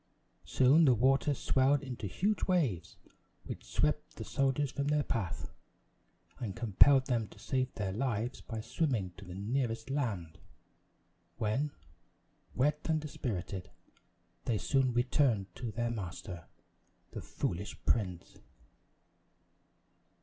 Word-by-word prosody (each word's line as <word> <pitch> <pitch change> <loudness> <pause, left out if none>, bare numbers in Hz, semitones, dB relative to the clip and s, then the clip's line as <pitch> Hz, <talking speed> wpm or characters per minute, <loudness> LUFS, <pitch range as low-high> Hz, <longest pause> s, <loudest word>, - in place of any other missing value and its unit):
Soon 130 - +5
the 130 -4 +6
water 135 +4 +3
swelled 135 +3 +2
into 125 -6 -5
huge 200 - 0
waves, 130 - 0 0.5
which - - -7
swept - - 0
the - - -6
soldiers 135 0 +1
from 140 0 -2
their 150 0 +2
path, 100 - -3 0.9
and 105 -6 -4
compelled 130 +5 +5
them 115 -4 0
to - - -16
save 130 -1 -1
their 100 -3 -2
lives 120 +1 -1
by 110 -2 -5
swimming 115 - -1
to 100 - -10
the 90 0 -8
nearest 115 +3 -2
land, 100 - -2 1.0
when, 120 +6 0 0.9
wet 150 +4 +2
and 160 -1 +3
dispirited, 105 - -4 0.8
they 115 - +1
soon 135 +3 +2
returned 120 -6 +2
to 120 +3 -5
their 120 +2 -1
master, 90 -4 -6 0.6
the - - -6
foolish 90 +4 -3
prince. 90 -6 -1
120 Hz, 120 wpm, -33 LUFS, 100-135 Hz, 1.0 s, the